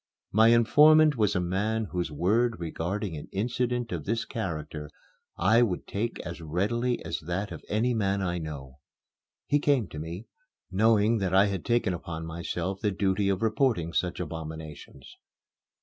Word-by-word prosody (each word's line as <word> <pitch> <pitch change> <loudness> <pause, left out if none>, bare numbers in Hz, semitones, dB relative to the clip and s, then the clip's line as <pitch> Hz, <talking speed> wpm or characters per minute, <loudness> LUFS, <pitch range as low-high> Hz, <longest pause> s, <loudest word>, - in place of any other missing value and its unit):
My 110 +2 +5
informant 150 +6 +6
was 105 -4 +1
a - - +2
man 105 +5 -1
whose 90 -3 -2
word 110 +9 +1
regarding 85 +3 -3
an 75 - -8
incident 120 +3 -1
of 85 -4 -3
this 115 +3 -1
character 75 -8 -5 0.5
I 110 +7 +4
would 105 -7 0
take 115 +4 -3
as 85 0 -7
readily 105 +10 -1
as - - -3
that 95 +4 -2
of - - -8
any 115 +4 +1
man 100 -3 0
I 90 -1 -1
know. 70 -4 -8 0.7
He 145 - +2
came 140 -8 +2
to 75 - -7
me, 85 +7 -6 0.5
knowing 110 +2 +3
that 95 -2 0
I 95 +1 +6
had 100 -4 -2
taken 120 -5 +1
upon 80 -1 -6
myself 85 +3 -4
the 105 - +2
duty 100 0 0
of 100 +2 0
reporting 110 - +1
such 90 0 -1
abominations. 80 -4 -8
100 Hz, 160 wpm, -28 LUFS, 85-115 Hz, 0.7 s, informant